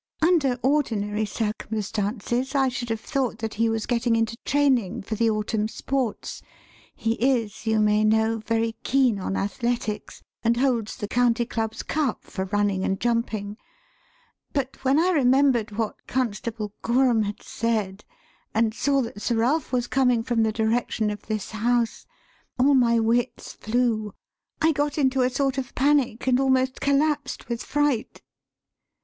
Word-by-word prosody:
Under 310 -7 +3
ordinary 220 -7 +1
circumstances 220 +4 -2
I 270 -1 +3
should 245 -1 -5
have 225 -1 -1
thought 260 -5 -1
that 225 -1 -4
he 230 +1 +1
was 225 -1 -1
getting 235 -1 +1
into 225 0 0
training 265 -11 +1
for 220 - -5
the 225 +1 +2
autumn 215 0 -1
sports 255 0 -3 0.5
(he 225 0 0
is, 235 -5 0
you 220 0 +3
may 210 0 +3
know, 220 +1 +2
very 225 +1 0
keen 255 -5 +2
on 195 +1 -2
athletics, 220 +1 -3 0.2
and 235 0 +2
holds 240 -4 0
the 205 - -5
County 240 0 +2
Club's 225 -1 -3
cup 300 -4 -1
for 190 -2 -4
running 200 -1 0
and 195 0 -1
jumping), 225 -3 -1 1.0
but 270 -2 -3
when 270 +2 +3
I 360 +3 +3
remembered 260 -6 +3
what 225 -2 -3
Constable 225 -3 -2
Gorham 240 -1 +3
had 205 -1 -4
said, 210 -4 -2 0.5
and 220 0 +2
saw 275 +3 +1
that 230 -3 -7
Sir 235 - 0
Ralph 255 +7 +1
was 245 -2 +1
coming 250 -2 +2
from 235 -2 0
the 220 0 +2
direction 220 -1 0
of 210 - -8
this 215 -2 -3
house, 230 +2 0 0.5
all 270 +3 +4
my 235 -3 +4
wits 235 +3 0
flew; 220 -3 -1 0.5
I 320 - +5
got 290 0 -1
into 265 -2 +2
a 250 - +3
sort 270 +1 0
of 255 - -6
panic 270 -4 +2
and 255 -1 +3
almost 260 -1 +1
collapsed 280 0 0
with 235 0 -3
fright." 290 -6 -1
235 Hz, 155 wpm, -25 LUFS, 220-260 Hz, 1.0 s, I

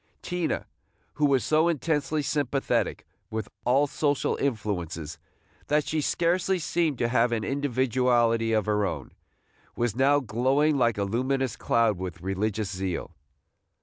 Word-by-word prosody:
Tina, 180 -2 -2 0.5
who 150 - +2
was 135 -3 +2
so 155 +2 +3
intensely 155 -1 0
sympathetic 135 -6 -1 0.2
with 110 -2 -4 0.2
all 135 +4 +4
social 145 0 0
influences 90 - -3 0.5
that 150 0 +2
she 155 -1 0
scarcely 175 +5 +1
seemed 165 -4 0
to 120 - +1
have 120 0 +2
an 115 -2 -1
individuality 125 -4 +1
of 110 -2 +2
her 105 -1 +1
own, 100 - -3 0.6
was 120 -3 -1
now 140 +3 +4
glowing 135 +5 +1
like 120 -5 +2
a 100 - 0
luminous 130 +4 -1
cloud 115 -5 +1
with 90 -1 -5
religious 100 +1 -2
zeal. 95 -2 -3
125 Hz, 135 wpm, -27 LUFS, 110-145 Hz, 0.6 s, all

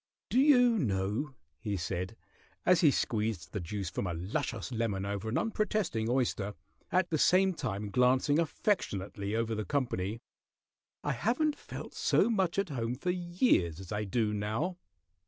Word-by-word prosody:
"Do 250 - +4
you 245 -5 +5
know," 105 - -1 0.2
he 100 +2 -2
said, 95 +3 -3 0.5
as 180 -2 +5
he 160 - +7
squeezed 110 -9 -1
the 100 - -1
juice 95 +1 -4
from 100 - -2
a 85 - -2
luscious 100 +6 -3
lemon 110 -5 -1
over 100 +2 -3
an 115 - 0
unprotesting 215 - 0
oyster, 115 -5 0 0.4
at 180 0 +2
the 155 - +1
same 190 +3 +4
time 105 - -4
glancing 130 +5 +3
affectionately 105 - -1
over 115 0 0
the 110 0 -2
company, 115 -6 -1 0.8
"I 145 - 0
haven't 245 - +1
felt - - -8
so 235 - +3
much 190 -5 +1
at 195 -2 +1
home 120 -3 -2
for 180 +7 -1
years 175 - +1
as 95 -2 -9
I 105 0 -1
do 105 +1 0
now." 110 - -2
115 Hz, 155 wpm, -31 LUFS, -, 0.8 s, he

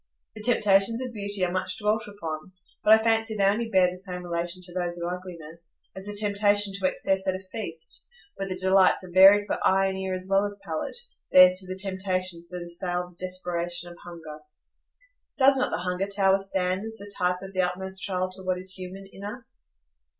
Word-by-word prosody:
The 215 - -8
temptations 215 -1 +4
of 250 -2 -6
beauty 200 -3 -1
are 175 - -3
much 185 0 -2
dwelt 215 +1 0
upon, 165 -4 -7 0.3
but 215 - +7
I 220 0 +5
fancy 225 -1 +1
they 200 - +1
only 215 +4 +2
bear 185 -3 +4
the 180 - -9
same 180 -1 -5
relation 175 +1 -3
to 175 -1 -6
those 175 -1 -2
of 170 0 -3
ugliness, 170 -2 -7 0.2
as 190 +1 -8
the 205 - -3
temptation 205 -1 +2
to 195 -1 0
excess 190 +1 -1
at 190 - +1
a - - -5
feast, 185 -4 -6 0.3
where 195 0 -4
the 185 - -3
delights 190 0 +4
are 185 - -10
varied 195 +3 +7
for - - -2
eye 195 +1 +4
and 190 0 -4
ear 190 -1 -2
as 185 0 -5
well 195 +1 +3
as 205 0 -4
palate, 160 - -3 0.3
bears 185 0 +8
to 185 0 +1
the 185 - -4
temptations 185 -3 -1
that 180 0 -6
assail 175 +1 -2
the 180 +1 -6
desperation 175 -1 -3
of 175 - -13
hunger. 160 -3 -10 1.0
Does 270 0 +6
not 255 - +1
the - - -2
Hunger 180 +2 -1
Tower 195 -1 +3
stand 190 0 -1
as 225 0 -6
the 205 -1 -6
type 180 +1 0
of 195 0 -9
the 185 - +1
utmost 190 +1 -3
trial 185 -1 -1
to 185 - -9
what 185 -1 -1
is 185 +1 0
human 190 +1 -8
in 195 0 -13
us? 230 +4 -10
190 Hz, 210 wpm, -26 LUFS, 180-200 Hz, 1.0 s, bears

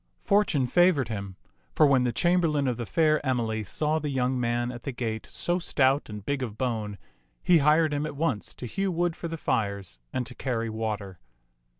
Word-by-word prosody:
Fortune 200 -10 +2
favored 155 -3 +3
him, 100 -3 -5 0.4
for - - +6
when 135 -3 +4
the 120 - +1
chamberlain 165 -3 +2
of 125 - 0
the 120 -3 -4
fair 155 -2 +2
Emily 115 -5 -1
saw 155 +9 -1
the 150 -1 -3
young 130 -1 0
man 120 0 0
at 120 -1 -8
the 140 - -4
gate 115 -3 -4
so 175 +1 -1
stout 140 -5 +1
and 105 -2 -8
big 140 -1 -1
of 110 -4 -4
bone, 110 -5 -2 0.5
he 175 -2 +5
hired 155 +1 +4
him 145 +1 -1
at 150 - -7
once 140 -8 -2
to - - -7
hew 195 - -1
wood 175 -1 0
for 170 - -5
the 165 0 -5
fires 100 - -2
and 130 -1 -2
to 125 - -6
carry 115 -4 -2
water. 105 -4 -4
130 Hz, 200 wpm, -27 LUFS, 115-155 Hz, 0.5 s, for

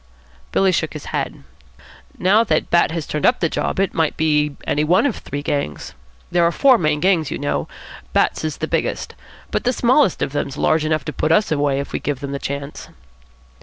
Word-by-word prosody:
Billy 195 -1 +3
shook 160 -2 -1
his 150 - -8
head. - - -3 0.7
"Now 205 +5 +4
that - - 0
Bat 170 - +4
has 160 -2 -4
turned 150 - -4
up 245 - +4
the 165 - +1
job, - - -2
it 195 -1 +1
might 160 -2 0
be 150 -2 +1
any 150 - +1
one 175 - +3
of 275 - 0
three 145 0 -6
gangs. 140 - -3 0.4
There 175 - +3
are 170 - +3
four 260 +5 +4
main 155 -2 +1
gangs, 175 -4 +2
you - - -3
know. 145 0 -2 0.4
Bat's - - +1
is 155 -2 -3
the - - -3
biggest. - - -2 0.4
But - - -1
the 250 - +2
smallest 255 - +3
of - - -2
them's 140 -2 -3
large 155 -1 +2
enough 155 -2 0
to 150 - -4
put 155 - 0
us 210 +4 +3
away, 145 -2 +1
if 140 - -6
we - - -1
give 145 -3 -3
them 140 0 -5
the 140 - -3
chance." 140 +1 -6
155 Hz, 210 wpm, -20 LUFS, 145-185 Hz, 0.7 s, Now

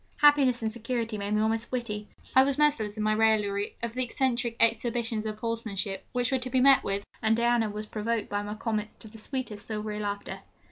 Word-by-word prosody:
Happiness 280 -5 +5
and 220 - 0
security 230 -1 -3
made 200 +1 -1
me 215 - +2
almost 220 +1 0
witty. 215 -4 -3 0.3
I 260 - +9
was 275 0 0
merciless 245 -9 +2
in 215 - -1
my 215 0 +2
raillery 210 -2 +1
of 235 -1 -2
the 255 +1 -1
eccentric 245 -1 0
exhibitions 230 -1 +1
of 215 0 -4
horsemanship 215 -4 -3
which 245 0 0
were 265 - +2
to 255 +1 -3
be 260 0 +2
met 270 +1 +6
with, 200 0 -2 0.2
and 225 0 +3
Diana 235 -2 +2
was 210 +1 -5
provoked 215 +1 -2
by 205 0 -2
my 205 +1 -5
comments 215 -1 -3
to - - -11
the 220 +1 -11
sweetest 225 -4 -4
silvery 210 -1 -4
laughter. 205 -1 -4
225 Hz, 205 wpm, -28 LUFS, 210-245 Hz, 0.3 s, I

